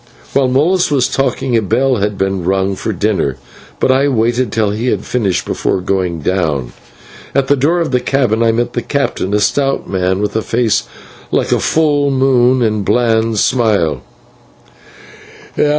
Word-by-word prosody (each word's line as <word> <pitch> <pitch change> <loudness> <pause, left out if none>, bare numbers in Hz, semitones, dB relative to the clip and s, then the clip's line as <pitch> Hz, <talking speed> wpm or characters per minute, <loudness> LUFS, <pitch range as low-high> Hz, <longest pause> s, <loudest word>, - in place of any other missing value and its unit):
While 135 -1 +3
Molas 160 +8 +2
was 135 -4 +2
talking, 130 -2 -1
a 115 - +3
bell 125 +5 +1
had 100 0 -2
rung 95 0 0
for 110 - -3
dinner, 95 -9 -1 0.4
but - - +2
I 135 +2 +2
waited 120 -2 0
till 110 -2 0
he 110 +4 -3
had - - -1
finished 105 -7 -1
before - - -1
going 90 -3 -2
down. 75 -8 -1 0.6
At 140 -1 +1
the 145 - +5
door 150 +6 +1
of 165 - -1
the 125 - +2
cabin 125 -4 0
I 115 -1 +3
met 120 +1 -1
the 120 - -1
captain, 140 -9 -2
a - - +2
stout 135 +6 0
man 95 0 -1
with 105 +1 -2
a 110 - +1
face 115 -2 0 0.4
like - - 0
a - - +2
full 145 -3 +1
moon 130 -2 +3
and 110 -1 0
a - - -3
bland 115 -2 +1
smile. 100 - +1
115 Hz, 165 wpm, -15 LUFS, 100-130 Hz, 0.6 s, the